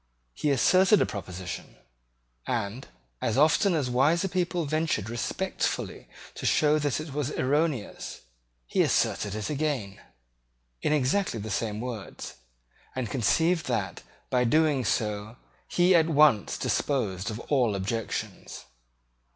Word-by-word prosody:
He 150 - -1
asserted 185 - +5
a - - +3
proposition; 90 -3 -7 0.7
and, 115 +1 -3 0.3
as 115 - 0
often 160 +6 +4
as 145 -5 0
wiser 145 +9 +2
people 175 -2 -1
ventured 150 -8 -1
respectfully 120 - -2 0.3
to - - -9
show 150 0 +3
that 145 -2 0
it 155 -2 -7
was 145 -1 -1
erroneous, 140 -3 -1 0.4
he - - +1
asserted 100 -1 +1
it 110 -1 -3
again, 140 -10 -2 0.8
in - - 0
exactly 150 - +1
the 105 +1 -5
same 105 0 -2
words, 120 - -7 0.6
and 125 -5 -3
conceived 160 - +2
that, 105 -8 -2 0.3
by 125 -1 +3
doing 145 +1 +3
so, 105 +1 -2 0.3
he 180 +1 +3
at 165 -1 +4
once 150 -8 +4
disposed 105 -8 -1
of 110 +1 -5
all 125 -8 +1
objections. 105 +3 -4
130 Hz, 125 wpm, -27 LUFS, 110-155 Hz, 0.8 s, asserted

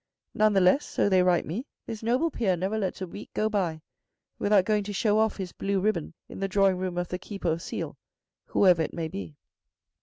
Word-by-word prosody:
None 215 0 +3
the 195 - +4
less, 185 +11 +4
so - - 0
they 185 -1 +5
write 180 -1 +3
me, 225 - -4 0.2
this 225 -2 -6
noble 250 +9 +1
peer 190 -9 0
never 190 +5 -1
lets 195 -3 -2
a - - -4
week 205 - -9
go 215 - +1
by 175 -7 -1 0.6
without 205 -2 +4
going 210 0 +1
to 205 - -4
show 210 +2 +2
off 220 -1 +1
his 185 -3 -5
blue 195 0 -1
ribbon 185 -5 -1
in - - -9
the 195 - 0
drawing 195 -1 +3
room 180 -1 -3
of 175 0 -2
the 180 - -3
Keeper 190 -3 -3
of 165 +1 -2
Seal, - - -5 0.5
whoever 180 -4 +4
it 160 - -3
may 165 -1 -2
be. 90 - -7
195 Hz, 220 wpm, -27 LUFS, 180-210 Hz, 0.6 s, they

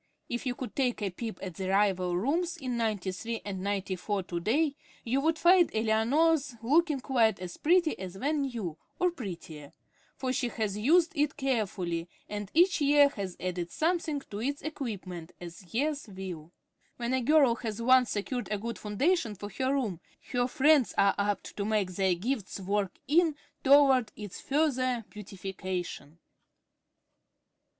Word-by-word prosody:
If 240 +3 -3
you 245 - -1
could 255 - -7
take 255 -3 +1
a 195 - -1
peep 225 +4 -5
at 185 -2 -5
the 190 +3 -4
rival 190 -3 +2
rooms 335 - 0
in 255 -5 -3
Ninety 215 -5 -1
three 225 +5 -4
and 190 -2 -4
Ninety 195 -1 -2
four 195 +2 -2
to 175 -1 -4
day, 275 - +1 0.3
you 255 +4 0
would 320 +2 +2
find 350 0 +5
Eleanor's 255 +6 +2
looking 300 +2 +3
quite 230 -7 +2
as 180 -1 -7
pretty 340 0 +2
as 190 0 -7
when 290 +6 0
new, 225 - -4 0.2
or 360 0 +2
prettier; 170 - -8 0.4
for 255 -1 -1
she 250 - 0
has 215 -4 -2
used 320 +11 +4
it 295 0 0
carefully, 190 - -1 0.2
and 205 -1 -5
each 350 0 +4
year 285 0 +6
has 195 -9 -6
added 180 -1 -3
something 320 - 0
to 205 -5 -7
its 280 +4 -2
equipments, 195 - -5
as 175 +1 -10
years 290 +3 -1
will. 185 -5 -7 0.5
When 240 +1 -2
a 260 - +2
girl 275 -1 +5
has 220 -2 -4
once 255 +1 +5
secured 245 +4 -3
a 210 - 0
good 230 +3 -5
foundation 225 - 0
for 205 +2 -8
her 260 +7 -1
room, 235 -11 -1 0.3
her 245 0 +1
friends 290 -1 +3
are 200 0 +5
apt 200 -1 -1
to 200 - -1
make 205 -3 0
their 190 0 +1
gifts 210 +1 -3
work 195 0 -1
in 320 +1 +3 0.3
toward 270 -4 +5
its 205 -3 -8
further 255 -5 +1
beautification. 185 -6 -6
230 Hz, 160 wpm, -29 LUFS, 195-280 Hz, 0.5 s, year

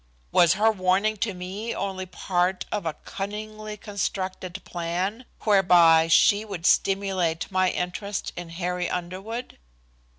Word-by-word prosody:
Was 170 -1 +5
her 220 +3 +4
warning 195 +2 +1
to 205 -1 -2
me 190 +6 -5
only 190 -1 -3
part 180 0 -1
of 200 -5 -2
a 155 - -2
cunningly 215 +1 -6
constructed 190 -2 -4
plan, 180 +7 -3 0.2
whereby 175 -5 +5
she 205 +5 +5
would 190 -6 -6
stimulate 190 -4 +1
my 185 0 +3
interest 190 +3 -3
in 175 -1 -7
Harry 180 +1 -2
Underwood? 190 +7 -5
190 Hz, 125 wpm, -25 LUFS, 180-205 Hz, 0.2 s, Was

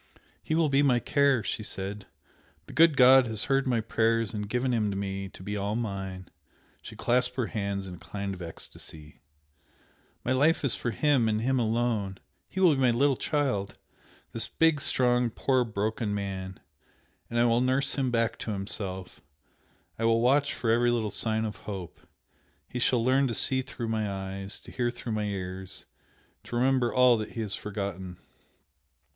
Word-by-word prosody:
"He 155 - -1
will 165 -1 +3
be 140 0 +3
my 130 -4 +4
care!" 140 -3 +2
she - - -3
said 100 -1 -5 0.6
"The - - -12
good 165 -3 +5
God 130 0 +7
has 110 -2 -1
heard 135 -1 +1
my 120 -3 +1
prayers 115 0 +1
and 105 -1 -4
given 125 +2 0
him 110 -3 +1
to 100 - -3
me 95 -1 -4
to 95 - -13
be 105 +1 -4
all 100 +1 -2
mine!" 95 -5 -4 0.5
She - - -10
clasped 125 +1 +1
her 125 -2 0
hands 100 -3 -3
in 90 - -8
a - - -9
kind 100 +4 -5
of 90 - -9
ecstasy, 80 -2 -10 1.0
"My 120 - 0
life 145 +4 +3
is 135 - +6
for 120 - -2
him 130 -2 +2
and 110 0 +1
him 130 +2 +1
alone! 110 -4 0 0.3
He 190 - -5
will 180 -4 +6
be 135 - -1
my 130 - +5
little 135 +4 +3
child! 125 -10 -1 0.5
this - - 0
big, 160 -3 +2
strong, 125 -2 +2
poor 130 +2 +1
broken 110 -1 -2
man! 95 -2 -5 0.7
and 120 - -3
I 120 - +4
will 120 0 +3
nurse 130 +2 +1
him 135 -2 0
back 115 -1 0
to - - -4
himself, 95 -2 -5 0.8
I 115 - 0
will 115 0 +4
watch 140 +4 +3
for 115 - 0
every 120 +1 +3
little 115 -3 0
sign 110 +2 -1
of 105 -2 -5
hope! 95 -5 -6 0.7
he 125 - -5
shall 120 -1 +2
learn 135 +2 +3
to 115 - -2
see 130 +4 +2
through 120 -3 -6
my 110 -2 -1
eyes 95 +1 -5
to - - -12
hear 120 -1 0
through 120 -1 -6
my 105 -1 -1
ears 95 -2 -5 0.6
to - - -6
remember 125 0 +2
all 125 -2 +5
that 110 - -5
he 115 - -3
has 105 -2 -1
forgotten!..." 95 -3 -5
115 Hz, 185 wpm, -28 LUFS, 100-125 Hz, 1.0 s, God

